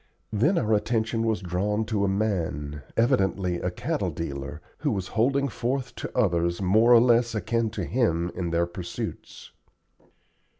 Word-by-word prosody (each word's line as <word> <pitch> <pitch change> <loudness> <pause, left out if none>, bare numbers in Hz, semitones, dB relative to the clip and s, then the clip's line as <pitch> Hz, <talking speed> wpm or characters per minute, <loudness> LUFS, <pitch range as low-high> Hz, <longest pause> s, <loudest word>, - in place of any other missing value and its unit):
Then 120 - +3
our 110 -7 +1
attention 115 +1 0
was 110 -2 0
drawn 100 +5 -1
to 105 -2 -1
a - - +2
man, 85 -8 -1 0.2
evidently 95 -7 +2
a - - -2
cattle - - -2
dealer, 75 -2 -5 0.2
who - - 0
was 95 -2 -2
holding 135 +5 +2
forth 130 +1 -2
to - - -6
others 85 -6 +2
more 110 +5 +4
or 120 - +9
less 120 -1 +3
akin 115 +1 0
to - - -4
him 90 -8 0
in 85 -2 -3
their 85 +1 +1
pursuits. 85 0 -7
105 Hz, 155 wpm, -26 LUFS, 85-115 Hz, 0.2 s, or